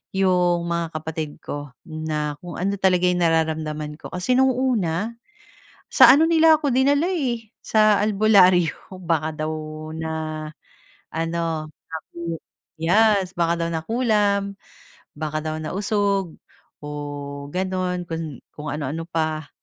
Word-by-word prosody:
'yong 180 -2 +2
mga 170 -1 -2
kapatid 155 -1 -5
ko, 145 -2 -6 0.2
na 155 -2 -3
kung 175 -1 -7
ano 195 +2 0
talaga 185 -2 +3
yung 180 0 +1
nararamdaman 155 -2 0
ko. - - -8
Kasi, 180 +7 -2
noong 265 0 +4 0.3
una, 180 +5 -1 0.8
sa - - +8
ano 310 +4 +5
nila 320 -1 +6
ako 290 - 0
dinala 285 +6 +3
eh, 240 - -2
sa 215 -1 +4
albularyo 190 -5 +3
baka 160 -2 0 0.2
daw 155 - -2 0.4
na 160 0 -3 1.0
ano, 165 -1 -2 0.2
sapi, 160 +1 -8 0.6
yes, 195 +1 +3
baka 170 0 +1
daw - - -2
nakulam, 200 +1 +1 0.6
baka 155 0 -2
daw 155 0 -2
nausog, 200 0 0 0.5
o - - -6 0.6
gano'n 185 0 -2
kung 160 -5 -5 0.2
kung 150 0 -6
ano 150 -2 -3
ano 165 +1 -4
pa. 155 -2 -2
175 Hz, 125 wpm, -23 LUFS, 160-200 Hz, 1.0 s, sa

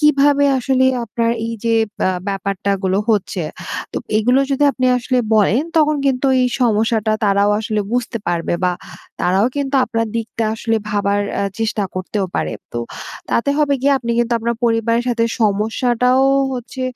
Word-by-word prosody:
কিভাবে 285 -1 +4
আসলে 260 0 +1 0.2
আপনার 230 +1 -1 0.2
এই 230 - -4
যে 230 0 +2 0.3
আ - - +2 0.2
ব্যাপারটা 195 0 -2
গুলো 190 +1 +1
হচ্ছে। 195 -4 0 0.5
তো - - 0 0.2
এগুলো 250 +5 +3
যদি 275 +2 +2
আপনি 255 0 0
আসলে 255 +1 0 0.2
বলেন, 215 +6 +3 0.2
তখন 305 -1 +3
কিন্তু 265 0 +1 0.2
এই 250 - +2
সমস্যাটা 220 -1 +1
তারাও 200 0 +3
আসলে 215 -1 -1
বুঝতে 245 -1 -1
পারবে, 170 0 -1
বা 180 - +2 0.5
তারাও 190 +5 +2
কিন্তু 280 -1 -2
আপনার 230 -1 -1
দিকটা 225 0 -3
আসলে 225 0 0
ভাবার 205 0 +1 0.2
এ - - 0 0.2
চেষ্টা 220 -2 -1
করতেও 190 +2 -2
পারে। - - -2 0.2
তো 120 - -3 0.5
তাতে 260 +4 +1
হবে 285 -2 +2
গিয়ে, 280 0 +4
আপনি 235 -2 -4
কিন্তু 240 0 +1
আপনার 235 0 -2
পরিবারের 230 +1 +1
সাথে 230 -1 +1 0.2
সমস্যাটাও 240 +5 +2 0.3
হচ্ছে, 255 +1 -6
230 Hz, 160 wpm, -18 LUFS, 205-255 Hz, 0.5 s, কিভাবে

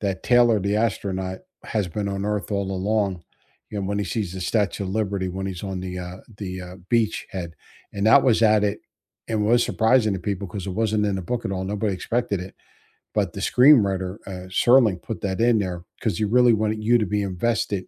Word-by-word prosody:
that 95 -2 -2
Taylor, 120 -3 +5
the 100 +2 0
astronaut, 95 -4 -2 0.2
has 105 -4 -1
been 100 +4 -3
on 100 0 -3
Earth 105 0 -2
all 100 -1 -1
along, 95 -2 -1 0.5
you 105 - -4
know, 95 - -3
when 100 0 -1
he 105 - -1
sees 100 -3 -3
the 95 - -6
Statue 100 0 0
of 95 - -4
Liberty 100 -3 -1
when 95 +1 -4
he's 95 0 -5
on 95 -2 -4
the, 90 0 -5
uh 90 +1 -7 0.2
the, 95 -2 -5
uh, 90 +1 -9
beachhead. 105 -6 -1 0.4
And 100 +1 -1
that 130 +5 +7
was 120 -4 +3
at 105 -1 +5
it 105 0 -1 0.5
and 110 -2 0
was 120 +2 +4
surprising 110 -2 +2
to 95 - -4
people 100 +1 -3
'cause 95 0 -6
it - - -3
wasn't 110 +1 0
in 100 -1 0
the 95 - -4
book 120 +6 -3
at - - -2
all, 95 0 -3
nobody 100 +1 -1
expected 115 0 -1
it. 95 - -9 0.6
But - - 0
the - - -6
screenwriter, 100 -8 +4
uh, 90 -1 -7
Serling, 110 -3 +4
put 115 - -6
that 95 +2 -2
in 120 -2 +4
there 90 -3 -3 0.2
'cause 105 -7 -1
he - - +1
really 120 +2 +5
wanted 110 0 0
you 120 +2 +4
to 110 - 0
be 105 +2 -1
invested 100 0 -1
100 Hz, 220 wpm, -23 LUFS, 95-110 Hz, 0.6 s, that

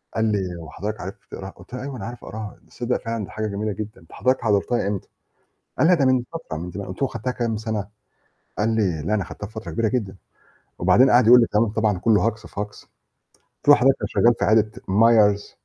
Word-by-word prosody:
قال 110 - +1
لي 105 -2 +1 0.2
"هو 80 - -10
حضرتك 105 +2 -5
عارف 95 +3 -6 0.2
تقراها؟" 95 0 -7
قُلت 90 +5 -16
له 125 - -4
"أيوه 140 -1 -6
أنا 100 - -6
عارف 120 +1 -8
أقراها، 110 -1 -7
تصدّق 125 0 -2
فعلًا 115 -1 -2
دي - - -16
حاجة 110 0 -3
جميلة 105 +1 -2
جدًا 105 -1 -7
أنت 80 - -21
حضرتك 130 +4 +1
حضرتها 105 0 +1
إمتى؟" 100 -2 -4 0.7
قال 150 - +5
"لا، 180 - +6
ده 150 -6 +3
من 130 -1 +3
فترة، 160 - -6
من 85 +2 -6
زمان" 100 +2 -6
قُلت 95 +5 -8
له 135 - +3
"خدتها 125 +1 -4
كام 115 -3 -2
سنة؟" 110 -2 -3 0.7
قال 105 +2 +1
لي 90 -8 0
"لا، 105 - +1
أنا 100 -3 0
خدتها 105 - -8
في 110 - -16
فترة 110 0 -7
كبيرة 115 -1 +1
جدًا" 105 -6 -2 0.6
وبعدين 100 +9 +5
قَعَد 120 -1 +5
يقول 125 +2 +9
لي 115 - +3
كلام 110 +2 +2
طبعًا 105 -2 0
كلّه 110 +2 +3
هجص 110 -1 -3
في 100 - -7
هجص، 105 0 -6 0.6
قُلت - - -27
له 145 - +10
"حضرتك 135 +1 +4
أنا - - -1
شغال 120 +1 +4
في - - +1
عيادة 110 0 +3 0.2
Myers 105 0 +4
110 Hz, 235 wpm, -23 LUFS, 100-120 Hz, 0.7 s, له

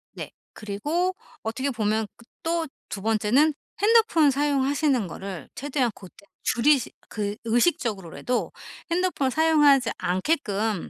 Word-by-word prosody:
네. - - -7 0.2
그리고 295 - -2 0.3
어떻게 260 +5 -2
보면 220 -3 0
그 235 - -18 0.2
또 330 0 0 0.2
2 195 - -6
번째는 225 +8 +3 0.3
핸드폰 415 -9 +4
사용하시는 280 -3 +1
거를 190 0 -7
최대한 260 -2 -1
고때 195 +1 -15 0.2
줄이시 275 +2 +3 0.2
그 205 -1 -3
의식적으로라도 235 - 0 0.4
핸드폰을 340 -6 +1
사용하지 295 -5 +4
않게끔 205 - -1
255 Hz, 280 characters per minute, -25 LUFS, 215-305 Hz, 0.4 s, 핸드폰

